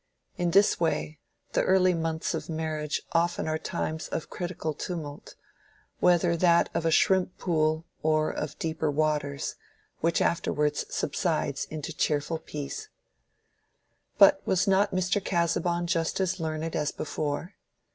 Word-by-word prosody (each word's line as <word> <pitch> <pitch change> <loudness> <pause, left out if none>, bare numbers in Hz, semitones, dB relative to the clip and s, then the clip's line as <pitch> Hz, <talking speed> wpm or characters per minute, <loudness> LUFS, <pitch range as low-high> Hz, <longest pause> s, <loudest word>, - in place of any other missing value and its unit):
In 175 -1 0
this 200 +4 +4
way, 160 -2 -1 0.3
the - - +2
early 185 -1 +4
months 160 -1 -1
of 160 - -4
marriage 155 -2 -2
often 170 0 +1
are 155 0 -1
times 160 0 -3
of 165 - -5
critical 175 -3 -3
tumult—whether 170 +2 -2
that 170 0 +4
of 165 - 0
a - - +4
shrimp 185 +2 +3
pool 155 -2 +1 0.2
or 155 0 +2
of 150 0 -5
deeper 160 -1 -1
waters—which 150 +2 -2
afterwards 150 -3 +1
subsides - - -1
into 155 +1 -6
cheerful 150 +1 0
peace. 150 - -6 1.3
But 295 -1 +7
was 185 0 +1
not 195 +1 +4
Mr. 185 +1 0
Casaubon 175 0 0
just 165 0 0
as 190 -1 0
learned 160 0 -3
as 150 -1 0
before? 155 +5 -3
165 Hz, 125 wpm, -28 LUFS, 155-175 Hz, 1.3 s, But